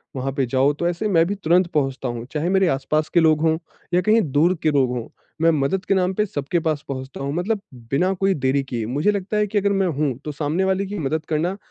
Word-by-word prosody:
वहाँ 135 +1 -2
पे 135 - +2
जाओ 135 +4 +2
तो 170 +4 -2
ऐसे 175 +5 -1
मैं 165 -5 +4
भी 205 - -2
तुरंत 180 0 +2
पहुँचता 135 -3 -1
हूँ, 120 -1 -4
चाहे 155 +3 -1
मेरे 190 -1 +3
आस-पास 155 +1 0
के 175 - +5
लोग 155 -2 +4
हों 160 0 +2 0.4
या 180 - +4
कहीं 215 +4 +4
दूर 165 +7 +3
के 155 - +3
लोग 135 -3 +2
हों, 115 - -5 0.3
मैं 165 0 +5
मदद 185 +9 0
के - - +2
नाम 185 -1 +1
पर 210 +2 +1
सबके 170 -3 -2
पास 155 -3 -1
पहुँचता 130 -1 -6
हूँ 140 - -2
मतलब 195 +5 -1 0.3
बिना 180 +8 +2
कोई 195 +1 +1
देरी 135 -2 0
किए 120 -4 -4
मुझे 145 - +1
लगता 200 +1 -2
है 210 0 +2
कि 210 - -2
अगर 200 0 +2
मैं 185 - +1
हूँ 145 -5 -1
तो 150 - -3
सामने 150 +5 -1
वाले 190 +1 +1
की 200 -1 -5
मदद 155 +2 -2
करना 165 +5 0
160 Hz, 250 wpm, -22 LUFS, 140-190 Hz, 0.4 s, के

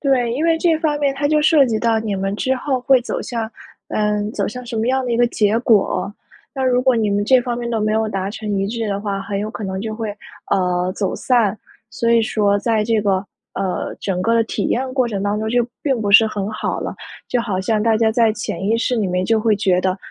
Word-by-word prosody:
对， 255 -5 +1
因 280 +7 -1
为 330 -1 +3
这 330 -1 +2
方 300 -3 0
面 280 -2 +1
它 285 +1 -1
就 305 0 +3
涉 310 -3 +5
及 220 -2 0
到 225 -1 +2
你 215 -2 -2
们 195 +1 -2
之 265 +3 0
后 260 -1 -1
会 260 0 +4
走 245 - -4
向 230 -2 -4 0.4
呃， 210 -1 0
走 200 -3 -1
向 250 +4 -7
什 235 - -5
么 225 +1 0
样 260 0 +1
的 245 - -3
一 - - +1
个 240 - +4
结 215 -1 +1
果。 205 -4 +2 0.4
那 265 - -2
如 250 -1 +3
果 255 -1 +3
你 215 -2 +1
们 205 0 +1
这 255 +2 +5
方 240 -1 -3
面 235 -1 -4
都 225 -2 -1
没 215 0 +1
有 220 0 +1
达 195 -1 -3
成 215 0 -7
一 195 - 0
致 225 +1 -3
的 200 0 -2
话， 200 -1 -3
很 200 0 -3
有 210 +2 -3
可 215 - -6
能 190 0 -3
就 220 0 -4
会， 220 -1 -4 0.4
呃， 180 -1 +1
走 195 - -2
散。 225 -5 +1 0.3
所 230 +1 -1
以 235 - +5
说 205 -2 +1
在 220 0 +1
这 225 -1 +1
个， 195 -1 0 0.3
呃， 190 -2 -3
整 185 -2 -2
个 230 +2 +2
的 230 - +4
体 - - -3
验 255 +1 -1
过 255 -3 +2
程 200 -3 -3
当 205 +1 0
中 220 0 -2
就 245 0 +2 0.2
并 265 -5 0
不 205 - -1
是 220 +3 +8
很 205 -1 -3
好 215 - -3
了， - - -4 0.3
就 245 - +1
好 200 -5 -2
像 215 +2 0
大 225 0 +3
家 220 0 +2
在 225 -1 +3
潜 185 -4 -5
意 225 - +2
识 245 +2 0
里 215 -4 0
面 180 0 -1
就 225 +1 +2
会 220 -1 +3
觉 185 -3 +2
得， 185 0 0
220 Hz, 280 characters per minute, -19 LUFS, 205-245 Hz, 0.4 s, 是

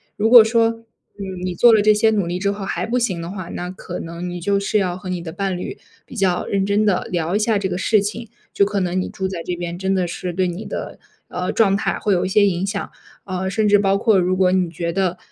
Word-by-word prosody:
如 215 +2 +1
果 240 -1 +10
说， 225 +1 +3
嗯， 200 -5 -9
你 180 - -2
做 235 +7 +6
了 215 - +5
这 215 +1 +5
些 215 +1 +3
努 205 -4 0
力 175 +1 -3
之 200 +1 0
后 200 -1 -5
还 - - -2
不 245 +2 0
行 190 -8 -1
的 170 - -6
话， 185 -3 -7
那 180 - -5
可 180 -1 -7
能 170 +2 -6
你 175 0 -5
就 200 +3 +1
是 200 +2 0
要 180 -2 -1
和 185 0 -8
你 180 -2 -3
的 165 - -7
伴 190 +2 -2
侣， 180 - -6 0.3
比 - - -12
较 185 -2 +1
认 195 -1 0
真 200 +2 +2
地 195 -3 +2
聊 170 +2 -1
一 - - +2
下 215 -1 +1
这 195 - -1
个 180 -1 -3
事 210 +2 +2
情， 215 +3 -5 0.2
就 200 - +3
可 205 0 -1
能 185 0 -1
你 - - -3
住 190 - -3
在 180 -3 -5
这 180 - -3
边， 175 0 -5
真 190 +1 -1
的 185 -2 0
是 180 +1 -4
对 185 +1 0
你 175 +5 -5
的， - - -6 0.3
呃， 180 +1 -3
状 200 -4 +3
态 200 - -1
会 205 - +1
有 180 0 +1
一 - - -2
些 205 +1 +4
影 180 0 -1
响。 200 0 -4 0.4
呃， 185 0 -3
甚 215 +1 +1
至 205 0 +6
包 195 0 +2
括 220 -1 +3
如 185 +1 +1
果 185 -1 +3
你 185 -2 +1
觉 170 +1 -3
得 185 0 -1
190 Hz, 295 characters per minute, -20 LUFS, 180-205 Hz, 0.4 s, 果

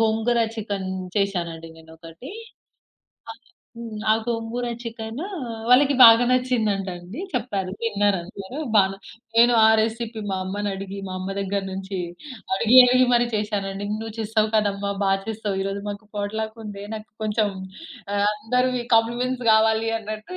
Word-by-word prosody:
గోంగూర 225 +2 +2
chicken 200 -4 -4 0.3
చేసానండి 170 -5 -2
నేనొకటి. 165 - -12 1.0
అది - - -17 0.3
హ్మ్. 230 -2 -7
ఆ - - +6
గోంగూర 235 +1 -2 0.2
చికెను 230 +5 -6 0.4
వాళ్ళకి 275 +3 +5
బాగా 230 +1 +9
నచ్చింది 250 -3 +1
అంట 195 0 -5
అండి 180 - -9
చెప్పారు, 205 -7 -2
తిన్నారందరూ. 200 0 -1 0.2
బాన 195 -2 +4 0.4
నేను 240 +1 +6
ఆ - - +7
రెసిపీ 225 0 -3
మా 190 - -1
అమ్మని 205 +2 -3
అడిగి, 195 0 -7
మా 185 - -6
అమ్మ 185 +1 -5
దగ్గర 200 0 -1
నుంచి 190 0 -5 0.6
అడిగి, 230 +5 +4
అడిగి 255 +1 +5
మరి 240 0 +3
చేశానండి. 205 -2 -3
నువ్వు 225 -1 -6
చేస్తావు 220 0 +1
కాదమ్మా, 200 -1 0
బా 195 - +2 0.2
చేస్తావు 215 -3 -3
ఈరోజు 195 +1 -3
మాకు 205 +1 -7
పోట్‌లకుంది 210 0 -4
నాకు 215 0 -9
కొంచెం 210 0 +1 0.7
ఆహ్, 200 0 +2
అందరివి 250 +3 0
కాంప్లిమెంట్స్ 245 +2 0
కావాలి 220 +1 +3
అన్నట్టు. 215 - -7
215 Hz, 135 wpm, -23 LUFS, 200-230 Hz, 1.0 s, బాగా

